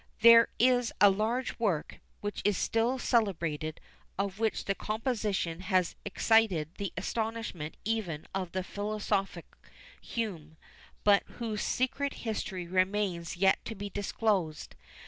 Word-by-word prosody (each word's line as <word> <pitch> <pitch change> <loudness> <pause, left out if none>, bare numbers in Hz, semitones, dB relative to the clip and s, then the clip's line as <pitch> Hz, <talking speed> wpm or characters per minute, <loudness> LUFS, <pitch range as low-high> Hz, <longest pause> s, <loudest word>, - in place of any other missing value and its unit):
There 230 0 +9
is 245 -1 +3
a 200 0 +8
large 225 +7 -1
work, 195 -10 -1 0.2
which 205 0 -3
is 205 -2 +2
still 230 +3 +1
celebrated, 170 - 0 0.4
of 200 0 -2
which 225 -1 0
the 195 - +1
composition 210 -6 -2
has 185 -1 +1
excited 205 -6 +2
the 200 -3 -2
astonishment 225 -9 -3
even 205 -9 -2
of 185 -2 -3
the 185 0 -2
philosophic 205 -3 -2 0.6
Hume, 170 -9 -4 0.5
but 205 -1 +6 0.2
whose 220 -3 -3
secret 275 +2 -1
history 190 -5 -3
remains 185 -1 0
yet 190 +1 +3
to 225 - -5
be 200 0 -6
disclosed. 200 -5 -1
205 Hz, 125 wpm, -30 LUFS, 185-225 Hz, 0.6 s, There